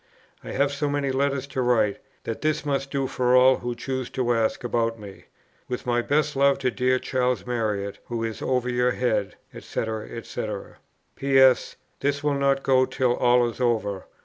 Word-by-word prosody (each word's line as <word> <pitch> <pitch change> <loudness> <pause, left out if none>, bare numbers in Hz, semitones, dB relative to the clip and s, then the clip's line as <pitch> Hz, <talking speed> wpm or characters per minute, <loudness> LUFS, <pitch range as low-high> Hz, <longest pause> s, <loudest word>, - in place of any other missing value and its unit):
"I - - -8
have 140 +1 +1
so 145 +1 -2
many 140 -1 -1
letters 140 0 0
to 130 - -2
write, 110 -5 +2 0.2
that 115 - -5
this 155 -2 0
must 135 -1 -1
do 135 -1 -1
for 125 -1 +1
all 130 +1 +6
who 120 0 -4
choose 130 +1 -4
to 120 -2 +2
ask 115 0 0
about 115 -1 0
me. 100 -2 -11 0.4
With 125 - -4
my 120 -1 +1
best 150 +3 0
love 140 0 +4
to 130 -2 0
dear 130 +1 +1
Charles 125 -1 -1
Marriott, 105 -5 -2
who 115 -1 -3
is 110 -1 -4
over 125 -1 0
your 125 0 +1
head, 110 -5 -1 0.2
&c., - - -3 0.4
&c. - - -5 0.7
"P.S. 135 -2 +4 0.2
This 145 +1 -1
will 145 -1 +2
not 140 0 +1
go 130 -1 +3
till 125 -2 +1
all 125 0 +3
is 120 +2 -6
over. 110 -5 0
125 Hz, 180 wpm, -25 LUFS, 120-135 Hz, 0.7 s, all